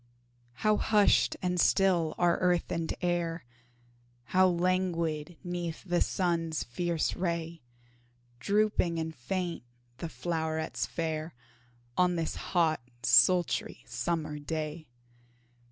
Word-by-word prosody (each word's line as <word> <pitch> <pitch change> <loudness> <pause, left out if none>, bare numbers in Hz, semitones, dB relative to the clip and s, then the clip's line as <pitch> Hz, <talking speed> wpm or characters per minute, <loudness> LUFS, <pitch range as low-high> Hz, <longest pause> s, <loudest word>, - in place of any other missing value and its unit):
How 215 0 +5
hushed 210 -2 +3
and 180 -1 0
still 175 -4 +3
are 175 -1 +3
earth 180 -2 +1
and 165 -1 -1
air, 170 -3 -1 0.8
How 185 +10 +4
languid 175 -3 0
'neath 175 -2 -4
the 175 -2 0
sun's 165 -4 0
fierce 170 +6 -1
ray 170 -2 -3 0.8
Drooping 200 - +1
and 160 0 -3
faint 175 +6 -3 0.4
the 165 - -4
flowrets 160 -9 -2
fair, 160 -1 -3 0.6
On 180 -1 +4
this 165 -2 -2
hot, 165 -5 +1 0.2
sultry, 170 +8 +3
summer 155 -3 -2
day! 155 +1 -4
170 Hz, 105 wpm, -30 LUFS, 160-180 Hz, 0.8 s, How